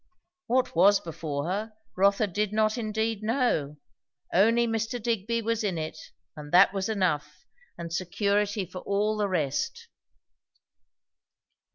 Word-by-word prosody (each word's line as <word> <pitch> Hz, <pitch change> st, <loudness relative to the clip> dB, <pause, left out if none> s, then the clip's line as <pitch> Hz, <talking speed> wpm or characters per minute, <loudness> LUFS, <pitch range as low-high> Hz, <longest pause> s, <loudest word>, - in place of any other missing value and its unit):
What 255 Hz, -4 st, +1 dB
was 195 Hz, +4 st, +6 dB
before 155 Hz, -3 st, -5 dB
her, 210 Hz, +5 st, -3 dB, 0.2 s
Rotha 200 Hz, +3 st, +3 dB
did 205 Hz, +1 st, -2 dB
not 215 Hz, 0 st, +2 dB
indeed 220 Hz, -2 st, -2 dB
know; 215 Hz, -, 0 dB, 0.6 s
only 230 Hz, +5 st, +4 dB
Mr. 225 Hz, +1 st, -2 dB
Digby 230 Hz, 0 st, -1 dB
was 230 Hz, 0 st, -1 dB
in 190 Hz, -5 st, -1 dB
it, 155 Hz, 0 st, -5 dB, 0.4 s
and 150 Hz, -1 st, -9 dB
that 185 Hz, +2 st, +6 dB
was 195 Hz, +1 st, -2 dB
enough, 180 Hz, -9 st, -1 dB, 0.3 s
and 170 Hz, -1 st, -6 dB
security 200 Hz, +3 st, 0 dB
for 185 Hz, +1 st, -8 dB
all 205 Hz, +3 st, 0 dB
the 210 Hz, -1 st, 0 dB
rest. 290 Hz, -, -2 dB
205 Hz, 130 wpm, -27 LUFS, 180-225 Hz, 0.6 s, was